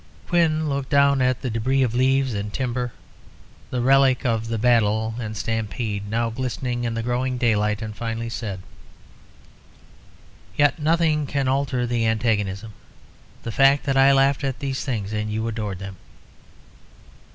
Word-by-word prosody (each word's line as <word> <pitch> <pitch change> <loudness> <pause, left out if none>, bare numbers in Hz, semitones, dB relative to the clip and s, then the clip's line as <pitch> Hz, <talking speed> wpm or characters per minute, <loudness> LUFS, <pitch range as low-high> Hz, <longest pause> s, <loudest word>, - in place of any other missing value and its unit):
Quin 160 -3 +2
looked 140 -2 -2
down 140 -1 +4
at 130 -1 +1
the 125 - -2
débris 130 +5 +1
of 115 - -3
leaves 130 +1 +2
and 105 0 -4
timber, 125 0 -2 0.8
the 125 - -2
relics 135 0 +4
of 115 -2 0
the 115 0 -2
battle 110 -1 +2
and 110 -2 -5
stampede, 110 -2 -3
now 115 +1 0
glistening 125 0 -3
in 115 -1 -2
the 115 - -2
growing 125 +2 -1
daylight, 105 -3 +1
and 110 -1 -6
finally 115 0 -4
said 105 -5 -5 1.9
"Yet 145 +1 +3
nothing 155 -1 +1
can 140 -1 -1
alter 130 -2 0
the 120 -1 0
antagonism 110 -2 -1 0.7
the 115 - -4
fact 135 +4 +4
that 135 - 0
I 135 +1 +6
laughed 135 +1 +3
at 135 -2 -2
these 135 -2 -3
things 110 -6 -3
and 105 0 -2
you 110 +1 -2
adored 105 -4 -3
them." 95 0 -8
120 Hz, 150 wpm, -23 LUFS, 110-135 Hz, 1.9 s, I